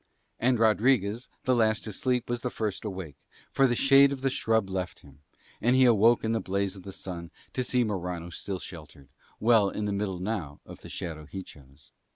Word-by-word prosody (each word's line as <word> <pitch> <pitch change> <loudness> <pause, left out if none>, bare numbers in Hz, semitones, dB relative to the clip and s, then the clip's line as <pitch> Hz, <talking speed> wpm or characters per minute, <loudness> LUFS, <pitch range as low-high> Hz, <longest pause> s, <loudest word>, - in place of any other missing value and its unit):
And 125 +1 +3
Rodriguez 110 0 +2
the 130 - +2
last 110 -2 +2
to 110 - -6
sleep 125 +2 0
was 120 0 -2
the 125 - -2
first 110 -3 -3
awake, 95 -8 -6 0.3
for 135 - +4
the 120 - +1
shade 135 +2 +6
of 135 -2 -4
the 135 0 +1
shrub 110 -5 +1
left 95 -1 -4
him, 70 0 -18 0.4
and 120 +3 +3
he 130 0 +6
awoke 115 0 +5
in 110 - 0
the 115 - +1
blaze 100 +1 -1
of 95 - -10
the 95 - -8
sun 85 -3 -7 0.2
to 130 - -1
see 125 0 +2
Morano 90 -5 -4
still 95 +3 -4
sheltered, 75 -6 -11 0.3
well 110 -3 +4
in 105 - -3
the 100 - -1
middle 100 -2 -2
now 90 -7 -4
of - - -12
the - - -11
shadow 80 -3 -6
he 95 +3 -6
chose. 70 -5 -17
105 Hz, 205 wpm, -28 LUFS, 90-120 Hz, 0.4 s, shade